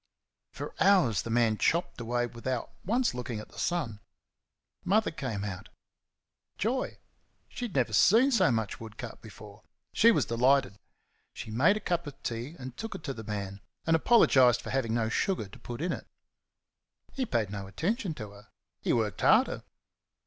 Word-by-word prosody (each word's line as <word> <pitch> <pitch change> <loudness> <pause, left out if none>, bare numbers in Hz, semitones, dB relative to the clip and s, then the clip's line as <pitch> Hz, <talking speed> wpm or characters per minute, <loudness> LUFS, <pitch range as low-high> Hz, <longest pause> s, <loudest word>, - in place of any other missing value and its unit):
For - - -7
hours 180 - +4
the - - -7
man 115 -2 +2
chopped 170 -6 0
away 120 +1 0
without 120 +1 -4
once 235 +5 +1
looking 125 -3 -4
at 105 - -10
the - - -12
sun. 145 -12 -1 0.8
Mother 215 +3 +2
came 120 -10 -4
out. 95 -3 -6 0.9
Joy! 250 +5 -1 0.5
She 245 - -5
had 210 - -7
never 120 -5 +1
seen 230 - +5
so 190 - +4
much 110 -4 -1
wood 110 -1 -10
cut 120 -4 -8
before. 105 -1 -12 0.3
She 230 - +6
was 235 - +3
delighted. 125 -2 +2 0.6
She 110 - -7
made 155 - +4
a - - -3
cup 175 -5 -2
of 140 -1 -9
tea 120 +7 -4
and 130 -2 -8
took 225 -2 -6
it 190 - -8
to 140 - -3
the 110 - -8
man, 100 -2 -5 0.2
and 165 - +4
apologised 130 - +5
for - - -6
having 115 -4 0
no 115 -2 +1
sugar 115 - 0
to 95 - -14
put 120 +2 -7
in 180 - 0
it. - - -5 1.1
He 270 - -1
paid 115 - -1
no 100 -2 -5
attention 180 - -2
to 105 -6 -7
her; 100 +1 -15 0.3
he - - +1
worked 110 -4 -1
harder. - - +4
125 Hz, 175 wpm, -29 LUFS, 110-175 Hz, 1.1 s, She